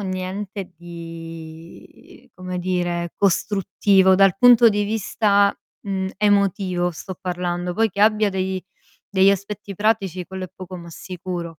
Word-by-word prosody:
niente 190 0 -5
di, 165 -1 -11
come 185 0 -5
dire, 175 -1 -2
costruttivo 195 0 +3
dal 195 -1 +4
punto 240 -1 +7
di 205 -1 0
vista, 205 -1 +1 0.3
mhmm, 190 -1 -2
emotivo 195 -3 +1
sto 185 +3 -8
parlando; 180 -1 -3
poi 225 +3 +2
che 200 - -5
abbia 215 -1 +4
dei 190 -1 -2 0.5
degli 195 0 +5
aspetti 200 +1 -4
pratici 195 -3 0
quello 190 0 -6
è 180 - -10
poco 185 0 -8
ma 170 -1 -10
sicuro. 175 -2 -6
190 Hz, 130 wpm, -22 LUFS, 175-200 Hz, 0.5 s, punto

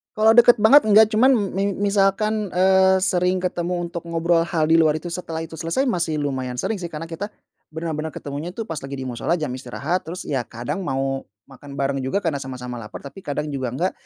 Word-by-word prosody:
Kalau 220 +1 +5
deket 240 +1 +7
banget 270 +3 +7
enggak, 215 +1 +6
cuman 230 +4 +4 0.2
mi 195 0 -1
misalkan, 205 +1 +1
eee, 190 0 +4
sering 180 -1 +2
ketemu 175 -1 -2
untuk 170 0 -5
ngobrol 170 0 +1
hal 165 -3 0
di 160 +2 +4
luar 155 -2 +4
itu 170 +2 -5
setelah 165 -2 -4
itu 160 -1 -9
selesai, 165 +12 0
masih 170 - 0
lumayan 130 -3 -3
sering, 205 - -2
sih, 175 - -4
karena 160 -1 -7
kita 165 +5 -5 0.4
bener-bener 160 -1 -5
ketemunya, 145 +6 -6
tuh, 225 - -3
pas 165 -8 -5
lagi 135 +1 -7
di 135 - -5
mushola, 130 +6 -1
jam 155 -6 -3
istirahat, 135 +8 -3
terus, 175 +3 -5
ya, 135 - -1
kadang 120 - -4
mau 135 0 -2 0.2
makan 140 +1 -11
bareng 140 -1 -1
juga 135 +10 -2
karena 160 -5 -1
sama-sama 125 -2 -6
laper, 105 -2 -9
tapi 140 +6 -10
kadang 150 -3 -4
juga 135 -2 -3
enggak, 180 +7 0
165 Hz, 205 wpm, -22 LUFS, 140-190 Hz, 0.4 s, deket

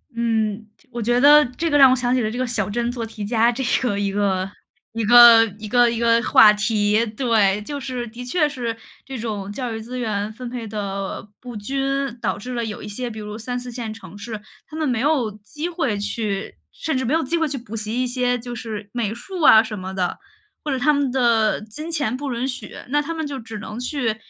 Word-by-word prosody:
嗯， 220 -2 -1 0.2
我 240 -1 -4
觉 240 +2 +2
得 295 +3 +8
这 330 0 0
个 - - +2
让 270 -2 +8
我 255 - +4
想 245 -1 0
起 255 - +2
了 215 - 0
这 230 - -5
个 255 - 0
小 220 -5 -2
镇 235 +3 -1
做 240 -2 -4
题 215 -2 -7
家 230 +2 +3
这 255 +3 -3 0.2
个 240 -6 0
一 200 -1 -1
个 195 -2 0 0.5
一 230 0 -2
个 235 0 +9 0.2
一 215 - -7
个 240 +2 +4
一 230 - -2
个 230 0 +3
话 210 -3 +7
题。 210 +1 +1
对， 215 -3 +1
就 285 +4 -5
是 250 -3 -4
的 235 +2 -9
确 300 +5 +1
是 240 -5 -4 0.3
这 270 -1 -6
种 210 -3 -4
教 245 +1 -4
育 220 - -5
资 245 +3 -7
源 210 -3 -2
分 245 +3 -8
配 240 -2 -6
的 200 -1 -4
不 245 -3 -8
均， 275 +3 -2
导 - - -1
致 250 +5 -7
了 235 -1 -2
有 215 -2 -6
一 - - -7
些， 240 +4 -4
比 220 - -9
如 210 0 -6
3，4 245 +2 -5
线 230 -2 -5
城 195 -4 -12
市， 215 +1 -6 0.3
他 305 - -11
们 310 -1 0
没 245 -4 0
有 270 -5 +1
机 215 +11 -6
会 320 - -1
去 205 -1 -3 0.2
甚 315 - -3
至 260 - -1
没 250 - 0
有 325 - +1
机 295 +6 -1
会 320 -1 +1
去 280 -1 -4
补 230 -3 -8
习 220 +3 -2
一 - - 0
些 250 0 0
就 245 0 -7
是 215 -3 -7
美 225 -4 -1
术 365 +9 -7
啊 220 -7 +8
什 215 -3 -6
么 190 +1 -6
的。 185 -2 -2 0.5
或 295 - -1
者 265 - 0
他 300 +4 +3
们 285 -3 0
的 235 -4 +2
金 300 +10 -8
钱 290 -8 -1
不 275 +1 -4
允 240 +2 -2
许， 250 -5 -6 0.2
那 295 +2 +2
他 330 +3 -4
们 320 -1 -3
就 285 -1 -5
只 225 -2 -8
能 215 +2 -7
去 250 -3 -1
235 Hz, 250 characters per minute, -22 LUFS, 215-255 Hz, 0.5 s, 个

